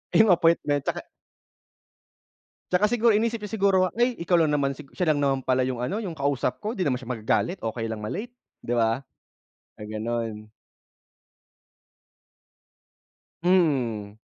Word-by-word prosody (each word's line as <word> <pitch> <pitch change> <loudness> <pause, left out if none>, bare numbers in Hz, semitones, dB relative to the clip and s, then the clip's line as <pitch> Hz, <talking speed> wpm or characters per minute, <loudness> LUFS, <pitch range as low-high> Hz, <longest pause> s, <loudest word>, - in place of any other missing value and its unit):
Yung 220 -1 +6
appointment 165 -4 +2
'tsaka. - - -3 1.6
'Tsaka 180 +3 +3
siguro, 230 -1 +3
inisip 230 0 -1
niya 210 - -6
siguro, 195 -3 +2
ay, 245 +1 +3
ikaw 175 +1 +3
lang 155 -3 +3
naman 140 -2 0
si 150 - -10
siya 180 -4 0
lang 155 - +3
naman 135 -1 +1
pala 130 0 +1
yung 125 -2 -3
ano 180 +12 -2
yung, 195 -7 -4
kausap 140 -4 -1
ko 215 +3 -4
di 185 - 0
naman 130 -2 0
siya 125 - -10
magagalit, 125 - 0
okay 115 0 -3
lang 110 - -3
ma 105 0 -5
late 235 +4 -5 0.3
'di 120 - -3
ba? 115 +3 +2 0.8
Gaganun. 110 0 -4 2.9
Mhm. 125 - +1
145 Hz, 140 wpm, -25 LUFS, 120-190 Hz, 2.9 s, Yung